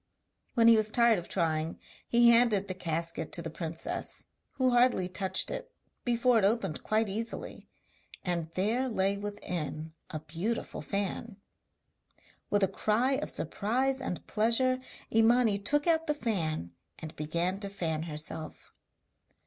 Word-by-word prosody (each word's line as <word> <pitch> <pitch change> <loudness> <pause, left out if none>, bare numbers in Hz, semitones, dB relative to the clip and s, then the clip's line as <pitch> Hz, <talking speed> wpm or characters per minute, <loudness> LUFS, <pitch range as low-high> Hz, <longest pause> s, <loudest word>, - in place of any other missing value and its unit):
When 230 -2 +5
he 230 - +9
was 215 -1 +2
tired 235 -2 +4
of 175 - -9
trying 160 -2 -1 0.3
he 235 0 +6
handed 230 -4 +4
the 185 - -3
casket 165 -2 -3
to 170 - -2
the 165 - -5
princess, 165 0 -4 0.3
who 260 -1 +2
hardly 245 -6 +3
touched 190 0 -1
it - - -5 0.3
before 240 -1 +3
it - - 0
opened 205 -6 +1
quite 220 +1 +1
easily, 225 +4 -4 0.6
and 170 -3 -1
there 230 +8 +1
lay 195 -3 +1
within 180 -6 -4 0.2
a 155 - -4
beautiful 175 +9 -3
fan. 200 +2 -3 1.1
With 205 -1 +2
a - - +5
cry 225 +8 +1
of 270 - 0
surprise 260 - 0
and 180 -9 -4
pleasure 235 +4 +2 0.3
Imani 225 -1 +4
took 290 +8 +1
out 325 -1 +2
the 300 - +1
fan, 160 - -2 0.3
and 155 -1 -8
began 170 +5 -1
to 200 -1 -4
fan 165 -6 -2
herself. 155 0 -6
205 Hz, 140 wpm, -30 LUFS, 170-235 Hz, 1.1 s, he